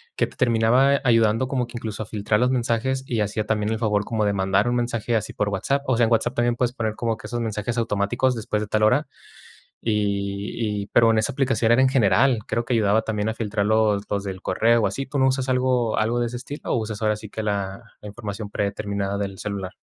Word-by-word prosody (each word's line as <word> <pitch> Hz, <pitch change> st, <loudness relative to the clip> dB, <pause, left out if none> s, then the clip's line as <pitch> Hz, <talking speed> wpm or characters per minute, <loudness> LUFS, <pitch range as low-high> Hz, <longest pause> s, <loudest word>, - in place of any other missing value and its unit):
que -, -, +2 dB
te -, -, -14 dB
terminaba 125 Hz, +4 st, +3 dB
ayudando 115 Hz, 0 st, +3 dB
como 125 Hz, -2 st, -1 dB
que 120 Hz, -, -8 dB
incluso 110 Hz, -2 st, -5 dB
a -, -, -4 dB
filtrar 105 Hz, 0 st, 0 dB
los 125 Hz, +1 st, +3 dB
mensajes, 130 Hz, +1 st, 0 dB
y 120 Hz, -3 st, -2 dB
hacía 105 Hz, +1 st, -1 dB
también 105 Hz, 0 st, 0 dB
el 110 Hz, -, 0 dB
favor 105 Hz, -3 st, +1 dB
como 110 Hz, -1 st, -1 dB
de 100 Hz, -, +1 dB
mandar 95 Hz, +2 st, +1 dB
un 120 Hz, -, +1 dB
mensaje 120 Hz, -1 st, -1 dB
así 110 Hz, -1 st, -1 dB
por 105 Hz, -, -1 dB
WhatsApp. 135 Hz, +8 st, -1 dB
O 130 Hz, -, +1 dB
sea, 120 Hz, -, +4 dB
en -, -, -3 dB
WhatsApp 115 Hz, +2 st, +2 dB
también 120 Hz, -1 st, +1 dB
puedes 120 Hz, 0 st, 0 dB
poner 110 Hz, -3 st, -2 dB
como 115 Hz, -1 st, -2 dB
que -, -, -10 dB
esos 120 Hz, +1 st, -3 dB
mensajes 110 Hz, 0 st, -3 dB
automáticos 115 Hz, +3 st, +1 dB
después 110 Hz, -2 st, -2 dB
de -, -, -6 dB
tal 110 Hz, +1 st, 0 dB
hora. 125 Hz, +8 st, +3 dB, 0.8 s
Y 100 Hz, 0 st, -1 dB
y -, -, -7 dB
pero 115 Hz, +2 st, +4 dB
en 110 Hz, -, +2 dB
esa 110 Hz, -, +1 dB
aplicación 130 Hz, -4 st, +1 dB
era 120 Hz, -, +5 dB
en 130 Hz, -, +5 dB
general. 130 Hz, 0 st, +3 dB
Creo 115 Hz, +2 st, -1 dB
que 125 Hz, -, -1 dB
ayudaba 110 Hz, -1 st, +3 dB
también 105 Hz, -1 st, -2 dB
a 110 Hz, -, -2 dB
filtrar 110 Hz, -2 st, -2 dB
los 110 Hz, -2 st, +2 dB
los 100 Hz, -1 st, -1 dB
del 95 Hz, -1 st, -6 dB
correo 115 Hz, +5 st, +2 dB
o -, -, +3 dB
así. 135 Hz, -, -4 dB
¿Tú 140 Hz, +2 st, -4 dB
no 130 Hz, -, +4 dB
usas 130 Hz, 0 st, -1 dB
algo 125 Hz, -3 st, +1 dB
algo 115 Hz, +3 st, +1 dB
de 120 Hz, -, +1 dB
ese 120 Hz, +1 st, -5 dB
estilo, 140 Hz, +4 st, -8 dB
o -, -, +2 dB
usas 110 Hz, -2 st, -4 dB
ahora 110 Hz, 0 st, +2 dB
sí 105 Hz, 0 st, -10 dB
que 110 Hz, -, -4 dB
la 100 Hz, 0 st, -2 dB, 0.2 s
la 105 Hz, -, -9 dB
información 105 Hz, -1 st, -6 dB
predeterminada 100 Hz, -1 st, -2 dB
del 100 Hz, -2 st, -4 dB
celular? 100 Hz, -3 st, -4 dB
110 Hz, 240 wpm, -23 LUFS, 105-120 Hz, 0.8 s, era